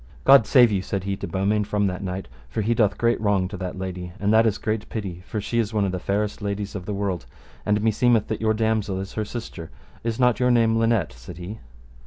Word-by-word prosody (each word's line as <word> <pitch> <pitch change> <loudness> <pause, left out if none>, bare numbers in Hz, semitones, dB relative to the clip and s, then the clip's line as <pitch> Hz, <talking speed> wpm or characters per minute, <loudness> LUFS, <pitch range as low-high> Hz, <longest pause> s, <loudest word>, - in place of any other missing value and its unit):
God 135 -5 +7
save 125 -5 +6
you, 95 -2 +1
said 95 0 -3
he 100 0 -2
to - - -5
Beaumains, 100 +2 0
from 105 -1 +1
that 95 0 -2
knight, 95 0 -4 0.2
for 110 - -2
he 115 +3 +2
doth 110 -3 +2
great 115 -1 +1
wrong 100 -3 +2
to 100 - -6
that 90 0 -5
lady, 90 -1 -5
and 105 +1 +2
that 115 +1 +5
is 105 - 0
great 110 -1 -3
pity, 95 -6 -5
for 110 - -3
she 115 +3 -1
is 110 -1 -1
one 105 -2 +2
of 95 - -1
the 90 - -3
fairest 105 +3 -2
ladies 100 0 -3
of 90 -3 -6
the 105 - -2
world, 100 -4 -2 0.4
and 105 0 +2
meseemeth 115 0 +3
that 110 - -3
your 110 -1 +2
damosel 110 -3 0
is 95 +1 -6
her 110 - -2
sister: 105 -8 -7 0.3
is 115 0 -2
not 125 -2 +3
your 125 0 +3
name 115 -2 +4
Linet? 115 - +1
said - - -11
he. 95 +5 -7
105 Hz, 245 wpm, -24 LUFS, 95-110 Hz, 0.4 s, God